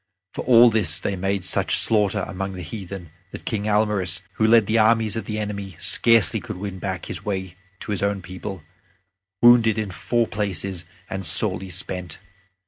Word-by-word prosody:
For - - -5
all 120 -1 +6
this 105 -5 +1
they 95 +1 -3
made 95 0 -2
such - - +1
slaughter 105 -3 +2
among 95 +1 -5
the 90 -1 -7
heathen 90 -2 -8 0.2
that - - -10
King 105 -3 -3
Almaris, 105 -4 0 0.2
who 110 - +2
led 115 -1 +5
the 110 +3 +1
armies 110 0 +2
of 115 - -4
the 105 - -4
enemy, 100 -3 -5
scarcely 115 +2 +4
could - - -8
win 95 -1 -6
back 95 -2 -5
his - - -6
way 95 -3 -4 0.3
to - - -6
his 100 - -1
own 100 -1 -1
people, 95 -1 -8 0.8
wounded 115 -2 +6
in 105 -3 -3
four 120 +5 -1
places 100 -4 -4 0.2
and 95 0 -5
sorely 95 +2 +3
spent. 90 -1 -5
100 Hz, 175 wpm, -22 LUFS, 95-110 Hz, 0.8 s, all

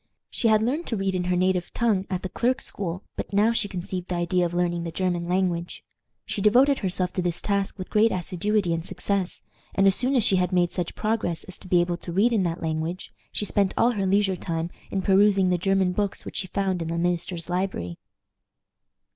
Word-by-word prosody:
She 235 - +1
had 215 -1 +4
learned 285 +9 -1
to 225 - -1
read 195 -1 0
in 180 -1 -1
her 180 0 +1
native 180 0 +1
tongue 210 -5 +1
at 185 -1 -3
the 185 - -3
clerk's 245 +7 0
school, 185 -1 -4
but - - -5
now 205 +3 +4
she 230 -3 +1
conceived 180 -1 -5
the 180 - -2
idea 175 +1 +1
of 170 - -9
learning 175 -1 0
the 170 - -3
German 175 -1 -1
language. 180 -1 -1 0.4
She 205 - -3
devoted 255 +7 +5
herself 185 -1 -1
to 185 - -1
this 175 -1 -1
task 200 -1 -1
with 185 - -7
great 220 +1 +4
assiduity 185 +1 0
and 165 0 -2
success, 190 +1 -2 0.3
and 195 - +3
as 195 - +7
soon 255 +7 +3
as 245 - +4
she 190 - +3
had 180 0 +1
made 175 -1 +2
such 175 -2 -3
progress 215 -7 -1
as 185 - -9
to - - -10
be 175 -1 +4
able 175 0 -1
to 175 - -7
read 210 +7 +3
in 215 - +3
that 170 -1 -2
language, 160 +3 -3 0.2
she 210 - -1
spent 200 -2 +1
all 240 - +4
her 200 -5 -1
leisure 195 0 +2
time 165 -1 -3 0.2
in 195 -1 -2
perusing 195 -1 +4
the 180 -1 +1
German 195 0 +2
books 200 +1 -2
which - - -6
she 190 - 0
found 190 -2 -1
in 165 - -3
the 165 +1 -2
minister's 175 0 -1
library. 175 - -2
185 Hz, 220 wpm, -25 LUFS, 175-200 Hz, 0.4 s, as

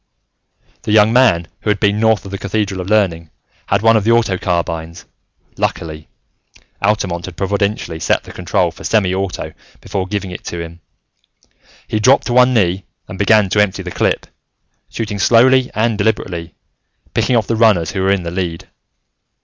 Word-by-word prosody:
The - - -3
young 105 +1 +5
man 110 -10 +3
who - - -2
had 105 -1 +1
been 105 0 +1
north 110 -2 +2
of 95 - -8
the 100 - -5
Cathedral 100 -2 -2
of 90 - -7
Learning 90 -7 +1 0.4
had 100 +1 +1
one 115 0 +5
of 110 - +2
the 110 - 0
auto 115 -5 +2
carbines; 85 -2 -3 0.5
luckily, 80 -1 -3 0.7
Altamont 100 -4 0
had 90 -2 -10
providently 100 -3 -2
set - - 0
the - - -11
control - - -1
for - - -14
semi 100 -5 +1
auto 95 -1 -4 0.3
before 95 -2 -4
giving 100 -2 -4
it 90 - -8
to 85 - -5
him. 85 0 -8 1.1
He 110 - -1
dropped 130 +6 +4
to 120 - -2
one 125 +1 +5
knee 95 -5 +1 0.2
and 95 - -9
began 105 0 +4
to 105 - +3
empty 105 -3 -1
the - - -6
clip, - - 0 0.6
shooting 105 -3 -4
slowly 125 +5 +4
and 110 0 0
deliberately, 85 -5 -2 0.6
picking 125 - +1
off 115 -3 +2
the 115 - -1
runners 105 -8 +3
who 95 - -3
were 95 +1 +2
in 100 -2 0
the 85 - -5
lead. 85 -2 -4
100 Hz, 175 wpm, -17 LUFS, 90-110 Hz, 1.1 s, young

